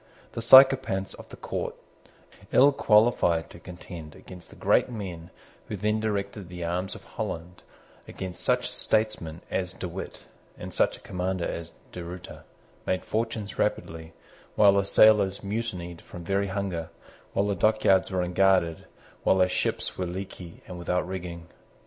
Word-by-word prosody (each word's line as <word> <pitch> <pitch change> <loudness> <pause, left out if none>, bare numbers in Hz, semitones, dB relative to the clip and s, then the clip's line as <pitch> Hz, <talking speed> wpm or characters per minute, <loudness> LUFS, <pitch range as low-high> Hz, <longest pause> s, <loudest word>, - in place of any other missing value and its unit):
The 115 - -5
sycophants 130 -6 +6
of - - -12
the - - -10
court, - - -4 0.8
ill 140 +2 +6
qualified 105 -9 +3
to - - -12
contend 85 -3 -10
against 90 -2 -13
the - - -14
great - - +2
men 90 -8 -6 0.4
who 105 - -4
then 105 +3 0
directed 100 -3 -3
the 90 -1 -6
arms 90 +3 -2
of - - -11
Holland, 85 +2 -6 0.5
against 90 -2 -7
such - - +1
a - - -4
statesman 105 -7 -1
as 90 -1 -2
De 95 -1 -5
Witt, 90 +3 -8 0.3
and - - -8
such - - +2
a - - -20
commander 90 0 -2
as 85 0 -5 0.2
De 90 - -7
Ruyter, 90 +1 -9 0.4
made 95 - -1
fortunes 110 -2 -3
rapidly, 80 0 -2 0.4
while 100 -2 +6
the 100 -1 +2
sailors 100 -2 +5
mutinied 100 -5 -4
from 90 - -10
very 100 +3 0
hunger, 95 -4 -3 0.4
while 100 - +1
the 100 - 0
dockyards 100 -1 +3
were 95 -2 0
unguarded, 90 -2 +2 0.4
while 95 - +4
the 90 -1 +4
ships 90 - -2
were 90 - -1
leaky 90 -1 -8
and 90 -1 -8
without 90 +1 -1
rigging. 90 -2 -6
95 Hz, 155 wpm, -27 LUFS, 85-100 Hz, 0.8 s, sycophants